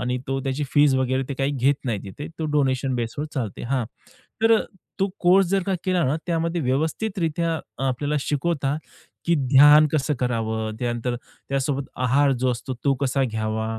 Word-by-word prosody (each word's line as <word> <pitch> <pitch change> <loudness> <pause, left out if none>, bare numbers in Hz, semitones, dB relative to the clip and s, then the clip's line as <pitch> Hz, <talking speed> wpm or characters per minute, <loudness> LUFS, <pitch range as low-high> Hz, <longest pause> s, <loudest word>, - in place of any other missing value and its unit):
आणि 125 0 -1
तो 135 0 -1
त्याची 135 +2 -2
फीस 145 -2 +5
वगैरे 130 0 +1
ते 140 - -3
काही 135 +1 +1
घेत 140 0 +2
नाही 115 -5 -1
तिथे. 100 +9 -7
तो 160 - -2
डोनेशन 135 -2 +1
बेसवर 120 +5 -3
चालते. 115 -8 -4
हां, 125 -1 -1 0.6
तर 225 0 +6 0.4
तो 195 0 +2
कोर्स 185 +1 +5
जर 195 +2 +1
का 190 +1 -1
केला 185 -2 +1
ना, 135 +4 +1
त्यामध्ये 170 0 0
व्यवस्थितरित्या 165 - -1
अ, 135 - -10
आपल्याला 145 +4 -1
शिकवता, 145 -1 -1 0.5
की 170 - +3
ध्यान 145 +2 +7
कसं 150 0 +1
करावं? 110 -3 -1
त्यानंतर 120 0 -2
त्यासोबत 135 +2 -3 0.2
आहार 135 +3 +3
जो 130 0 0
असतो, 125 +2 -4
तो 140 - +3
कसा 135 0 +1
घ्यावा? 110 -1 -2
135 Hz, 170 wpm, -23 LUFS, 125-155 Hz, 0.6 s, ध्यान